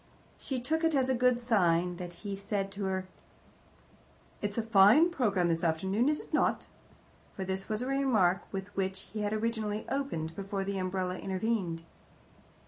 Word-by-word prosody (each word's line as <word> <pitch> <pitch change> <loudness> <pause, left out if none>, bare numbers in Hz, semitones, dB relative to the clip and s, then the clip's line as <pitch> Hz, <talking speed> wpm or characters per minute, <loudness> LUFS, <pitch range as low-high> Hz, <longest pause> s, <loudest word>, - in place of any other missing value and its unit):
She 265 -2 -3
took 315 +7 -1
it 325 -2 +3
as 265 -1 +2
a - - +3
good 250 0 +3
sign 180 -7 +2
that 175 -1 -6
he 200 -1 -2
said 200 0 -3
to 200 0 -4
her, 190 -1 -2 1.3
"It's 205 +1 -3
a 230 - +1
fine 225 - +6
programme 205 - +1
this 165 0 0
afternoon, 190 - +1
is 300 - +1
it - - -13
not?" - - +2 0.7
for 190 - -4
this 190 +2 -3
was 215 +1 0
the - - -1
remark 230 -10 +2
with 195 +1 -6
which 190 0 -3
he 220 - -3
had 205 0 -1
originally 215 -1 -1
opened, 165 - -2
before 195 0 -3
the 195 0 -2
umbrella 185 0 -2
intervened. 190 -4 -2
200 Hz, 170 wpm, -31 LUFS, 185-235 Hz, 1.3 s, fine